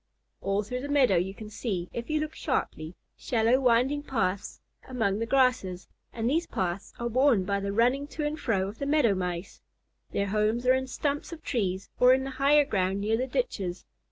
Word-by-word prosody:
All 195 +1 0
through 250 +5 -4
the 285 - -6
meadow 260 -10 +4
you 190 +3 -1
can 215 0 -9
see, 195 -6 -3
if 235 +3 -5
you 310 0 +1
look 310 0 -3
sharply, 155 +3 -3 0.2
shallow 235 +2 +2
winding 255 +3 +3
paths 205 -9 -2 0.3
among 220 -6 0
the 230 - -2
grasses, 255 -9 +1 0.2
and 230 -1 -2
these 330 +6 +1
paths 185 +1 -3
are 235 - -2
worn 240 -4 +3
by 200 +1 0
the 200 0 -3
running 250 +7 +2
to 300 - -1
and 300 +2 -2
fro 195 -5 0
of 205 +3 -9
the 280 - -2
Meadow 285 -8 +3
Mice. 180 -1 -4 0.5
Their 200 0 -1
homes 215 +4 +1
are 255 - +6
in 260 0 0
stumps 285 +5 -2
of 325 -2 -9
trees 195 -6 -1
or 250 +1 +7
in 265 - -2
the 270 - -5
higher 280 +3 +4
ground 190 -5 0
near 215 +2 +1
the 255 +3 -1
ditches. 195 - -3
235 Hz, 200 wpm, -28 LUFS, 195-270 Hz, 0.5 s, or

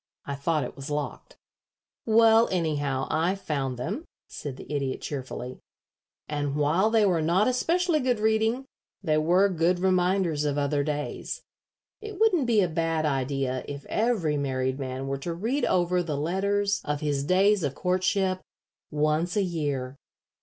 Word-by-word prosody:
"I 140 - -4
thought 150 +2 0
it 125 - -6
was 135 +2 -7
locked." 145 -6 -4 0.7
"Well, 225 0 +5
anyhow, 145 -6 0
I 170 +4 +1
found 140 -9 -3
them," 195 - -3 0.2
said 140 -3 -7
the - - -10
Idiot, 135 -2 -1
cheerfully; 130 -2 -6 0.7
"and 145 -1 -2
while 155 +8 +2
they 220 -2 +4
were 175 -4 +2
not 175 +7 +3
especially 330 +6 +1
good 250 -4 0
reading, 220 +4 +1 0.4
they 155 -3 +2
were 180 +5 +4
good 175 -1 +1
reminders 180 -3 +1
of 145 -1 0
other 145 0 +1
days. 150 0 -4 0.6
It 425 -3 -8
wouldn't 370 - +3
be 225 -3 +4
a 185 - +2
bad 165 -1 0
idea 135 -2 -1
if 140 -1 -7
every 210 -10 +1
married 130 -1 -1
man 130 0 -4
were 135 0 -2
to 165 +4 -4
read 235 +11 0
over 180 0 +2
the 155 -4 -3
letters 200 +6 0
of 150 -1 -2
his 145 -2 0
days 195 +5 +3
of 140 -3 -2
courtship 185 +1 0 0.5
once 155 +4 0
a 205 - +3
year. 145 -7 -3
165 Hz, 155 wpm, -27 LUFS, 145-200 Hz, 0.7 s, Well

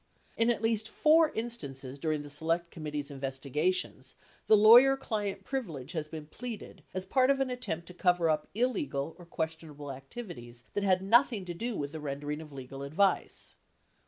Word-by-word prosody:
In 230 +1 +3
at 230 -2 0
least 220 -1 +2
four 315 +4 +5
instances 140 - -4
during 155 0 -1
the 145 - -9
Select 165 +3 -1
Committee's 150 -2 -5
investiga 140 +4 -1
tions, 135 -7 -4 0.3
the 215 - +7
lawyer 240 +6 +8
client 205 -6 -3
privilege 170 - -4
has 155 -3 -3
been 155 -1 -7
pleaded 215 +1 -7
as 185 0 -3
part 255 +6 +3
of 275 0 +3
an 265 -1 0
attempt 175 -10 -4
to 180 - -8
cover 180 -2 +2
up 155 -1 +1
illegal 165 - -1
or 175 - -12
questionable 160 -3 -5
activities 130 - -9
that 205 - -1
had 190 -1 +3
nothing 230 -1 +4
to 175 - -4
do 230 +6 -3
with 145 -4 -3
the 160 - -6
rendering 145 +1 -4
of 155 -2 -11
legal 135 0 -8
advice: 155 +8 +1
1. - - -41
170 Hz, 180 wpm, -31 LUFS, 145-220 Hz, 0.3 s, lawyer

